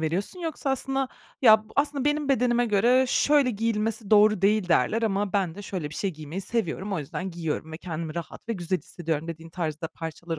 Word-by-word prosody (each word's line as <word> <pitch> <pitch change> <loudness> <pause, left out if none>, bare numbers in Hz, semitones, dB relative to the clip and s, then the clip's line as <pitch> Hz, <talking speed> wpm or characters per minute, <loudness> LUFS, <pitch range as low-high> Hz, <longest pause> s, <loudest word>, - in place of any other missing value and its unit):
veriyorsun 180 - -2
yoksa 315 -4 -2
aslında, 270 0 -1 0.3
ya 220 -2 +7
b - - -22
aslında 285 -1 +1
benim 295 -1 +1
bedenime 245 -2 +3
göre 240 +5 +4
şöyle 285 -2 +3
giyilmesi 220 -1 -1
doğru 210 -2 +5
değil 205 -2 +3
derler 215 - +2
ama 200 -2 0
ben 190 -5 0
de 205 - -8
şöyle 175 -7 -4
bir - - -9
şey 195 - -1
giymeyi 155 +4 -6
seviyorum, 195 -1 -2
o 185 - 0
yüzden 180 +6 -4
giyiyorum 160 -2 -4
ve 160 - -6
kendimi 165 -2 -5
rahat 170 +6 -7
ve - - +1
güzel 180 -2 -1
hissediyorum 165 -2 -4
dediğin 165 0 -7
tarzda 165 -2 -3
parçalar 165 0 -6
200 Hz, 195 wpm, -26 LUFS, 165-235 Hz, 0.3 s, ya